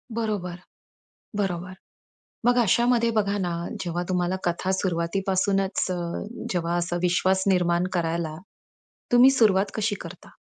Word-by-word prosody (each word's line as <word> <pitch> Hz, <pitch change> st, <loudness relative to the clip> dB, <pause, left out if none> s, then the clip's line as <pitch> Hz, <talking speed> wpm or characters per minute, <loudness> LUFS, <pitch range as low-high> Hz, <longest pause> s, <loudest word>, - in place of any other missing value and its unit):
बरोबर, 200 Hz, -6 st, -2 dB, 0.8 s
बरोबर. 185 Hz, -2 st, -2 dB, 0.7 s
मग 245 Hz, 0 st, +4 dB
अशामध्ये 235 Hz, +1 st, +3 dB
बघा 200 Hz, -1 st, +1 dB
ना 180 Hz, -2 st, -1 dB, 0.3 s
जेव्हा 175 Hz, -1 st, -2 dB
तुम्हाला 180 Hz, 0 st, 0 dB
कथा 175 Hz, +2 st, -1 dB
सुरुवातीपासूनच 190 Hz, +2 st, 0 dB
अ, 180 Hz, -, -1 dB, 0.6 s
जेव्हा 170 Hz, -1 st, -1 dB
असा 175 Hz, 0 st, -1 dB
विश्वास 185 Hz, +2 st, +2 dB
निर्माण 175 Hz, -1 st, +2 dB
करायला, 165 Hz, -2 st, -1 dB, 0.8 s
तुम्ही 250 Hz, +2 st, +8 dB
सुरुवात 205 Hz, -6 st, +3 dB
कशी 215 Hz, -1 st, 0 dB
करता? 170 Hz, +1 st, -10 dB
185 Hz, 115 wpm, -25 LUFS, 175-205 Hz, 0.8 s, तुम्ही